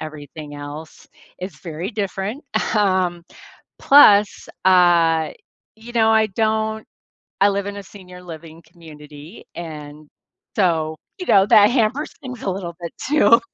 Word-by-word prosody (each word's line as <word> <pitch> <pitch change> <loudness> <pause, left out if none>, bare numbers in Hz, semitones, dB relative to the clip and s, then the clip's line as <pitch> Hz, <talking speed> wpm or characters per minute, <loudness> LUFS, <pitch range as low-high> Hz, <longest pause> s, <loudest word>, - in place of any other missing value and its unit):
everything 150 -1 -9
else. 145 +2 -10 0.3
It's 185 +1 -8
very 170 +3 -6
different, 205 +4 -4 0.3
um, 185 -4 0 0.5
plus, 210 -8 +5 0.2
uh, 170 -4 +4 0.5
you 230 +2 -12
know, 225 -2 +3
I 220 0 +4
don't 220 +1 -2 0.6
I 200 - +6
live 200 0 -2
in 205 0 -6
a 200 - -8
senior 180 -2 -14
living 165 -1 -11
community, 155 0 -14
and, 150 -2 -9 0.5
so, 160 -5 0 0.2
you 365 - -5
know, 195 - +5
that 210 -1 +6
hampers 245 +4 0
things 255 -3 -8
a 195 - -1
little 180 -3 -6
bit 170 - -6 0.2
too. 230 -6 +5
185 Hz, 135 wpm, -20 LUFS, 160-215 Hz, 0.6 s, I